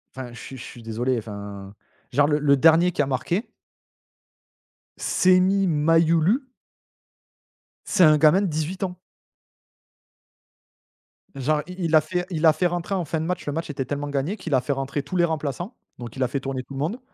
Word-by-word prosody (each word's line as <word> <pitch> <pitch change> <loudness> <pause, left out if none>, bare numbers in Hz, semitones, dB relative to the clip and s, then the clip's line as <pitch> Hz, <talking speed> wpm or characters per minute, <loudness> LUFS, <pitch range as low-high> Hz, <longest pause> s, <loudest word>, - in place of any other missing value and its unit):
enfin 130 -2 -7
je 120 - -10
suis 135 - -9
je 120 - -9
suis 120 -3 -11
désolé 120 +3 -1
enfin, 100 -2 -8 0.4
genre 145 +3 +3
le 150 0 +1
le 145 -1 +4
dernier 165 +5 +5
qui 165 - 0
a 140 - 0
marqué 170 - -2 1.5
Senny 185 +2 +3
Mayulu 165 - +3 1.5
c'est 185 - +3
un 155 -2 +7
gamin 155 +5 +5
de 200 - 0
18 160 +4 -3
ans. 180 -1 -3 2.4
Genre 150 +3 0
il 180 +1 -9
il 165 -1 +2
a 155 - +7
fait 180 +3 -3
il 165 -3 -1
a 160 - +7
fait 175 +4 +1
rentrer 175 +2 -3
en 180 -3 -1
fin 160 +2 -2
de 160 - -3
match. 180 +1 -3
Le 145 - -3
match 165 +2 -4
était 135 -2 -3
tellement 145 +2 -4
gagné 145 +9 -2
qu'il 170 -6 -5
a 130 - +4
fait 140 - -1
rentrer 135 +1 -3
tous 145 +6 -7
les 175 -1 +4
remplaçants, 160 - -4 0.2
donc 120 -2 -9
il 130 - -1
a - - +2
fait 135 +3 -2
tourner 135 -1 -4
tout 140 - -12
le 135 - -5
monde. 170 - -2
155 Hz, 195 wpm, -24 LUFS, 135-175 Hz, 2.4 s, un